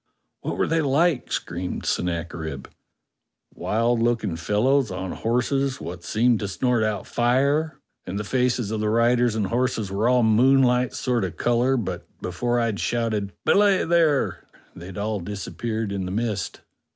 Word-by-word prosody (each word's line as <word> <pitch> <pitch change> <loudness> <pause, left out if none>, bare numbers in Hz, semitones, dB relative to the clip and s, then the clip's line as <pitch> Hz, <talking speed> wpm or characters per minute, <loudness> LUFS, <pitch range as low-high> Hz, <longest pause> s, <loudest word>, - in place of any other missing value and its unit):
"What - - -4
were - - +2
they 165 0 +1
like?" 150 +1 +1
screamed 90 +2 -3
Sennacherib. 85 -4 -3 0.9
"Wild 115 +2 0
looking 115 -6 0
fellows 110 - +1
on 95 0 -4
horses 135 +3 0
wot 85 0 -7
seemed 115 +4 +2
to 100 - -3
snort 125 +4 0
out 105 -2 -1
fire, 140 +6 +1 0.3
and 95 +2 -3
the 105 - -2
faces 125 -1 0
of 110 - -2
the 105 0 0
riders 120 +1 +3
and 110 -2 0
horses 115 -2 -1
were 105 +5 +1
all 125 -1 +4
moonlight 125 +2 +4
sort 125 -4 0
of 90 -3 -4
colour, 120 +2 +2
but 115 - -4
before 120 +7 -1
I'd 115 -4 -1
shouted, 110 -4 -1
'Belay 200 -2 +4
there!' 165 -4 +2 0.3
they'd 90 +3 -9
all 105 0 -2
disappeared 105 +3 -4
in 95 -2 -3
the 90 - -4
mist." 105 -1 -2
115 Hz, 150 wpm, -24 LUFS, 100-125 Hz, 0.9 s, all